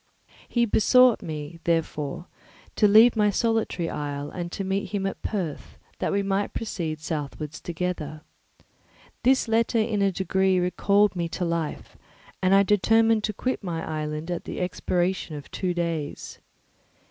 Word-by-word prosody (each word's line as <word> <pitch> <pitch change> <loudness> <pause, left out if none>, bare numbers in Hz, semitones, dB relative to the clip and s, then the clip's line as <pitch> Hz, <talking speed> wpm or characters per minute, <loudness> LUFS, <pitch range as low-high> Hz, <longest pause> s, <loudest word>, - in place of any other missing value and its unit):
He 235 -1 +2
besought 250 +2 +5
me, 155 +1 -6
therefore, 165 -2 -1 0.5
to 210 - +5
leave 220 +4 +7
my 210 -1 +3
solitary 225 -5 0
isle 145 -2 -4
and 175 -1 -5
to 195 - -4
meet 195 +1 -2
him 200 -1 -2
at 195 - -4
Perth, 175 -9 -4 0.2
that - - -1
we 200 0 +1
might 195 +1 -1
proceed 165 -8 -3
southwards 155 0 -5
together. 165 -3 -4 1.0
This 260 0 +3
letter 230 +1 +2
in 215 -2 +1
a 195 -1 +3
degree 190 0 +1
recalled 200 +3 +2
me 170 -1 -2
to 180 - -3
life, 165 -2 -3 0.4
and 190 +1 +4
I 200 - +6
determined 225 +2 +3
to 215 - -3
quit 255 +2 -2
my 170 -3 -3
island 155 +1 -4
at 175 - -4
the - - -5
expiration 180 -2 -1
of 145 - -9
two 185 -2 -1
days. 165 -4 -3
185 Hz, 150 wpm, -25 LUFS, 165-210 Hz, 1.0 s, leave